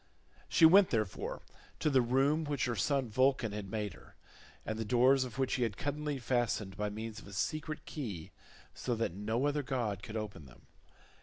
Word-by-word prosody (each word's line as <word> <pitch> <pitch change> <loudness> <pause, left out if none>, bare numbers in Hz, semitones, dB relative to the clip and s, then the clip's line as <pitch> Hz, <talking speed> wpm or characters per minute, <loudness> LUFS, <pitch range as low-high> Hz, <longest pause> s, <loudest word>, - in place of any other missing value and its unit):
She 165 - +6
went, 190 +4 +8
therefore, 110 -5 -2 0.3
to 155 - +1
the 130 -2 +5
room 135 +6 +2
which 145 -3 -1
her 120 -2 -1
son 135 +6 +1
Vulcan 130 0 +2
had 105 -2 -5
made 105 -3 -3
her, - - -17 0.5
and 110 0 -3
the - - 0
doors 125 +4 +4
of 125 -1 -9
which 130 -1 0
he 130 - 0
had 115 -4 0
cunningly 145 0 -2
fastened 120 -6 -1
by 105 0 -1
means 110 +1 -6
of - - -13
a 100 - -10
secret 155 +9 -3
key 105 - -6 0.4
so 120 - -2
that 115 -6 -1
no 110 +7 -1
other 145 0 +1
god 120 -8 -2
could 110 +2 -6
open 105 -9 -6
them. - - -18
120 Hz, 190 wpm, -33 LUFS, 105-140 Hz, 0.5 s, went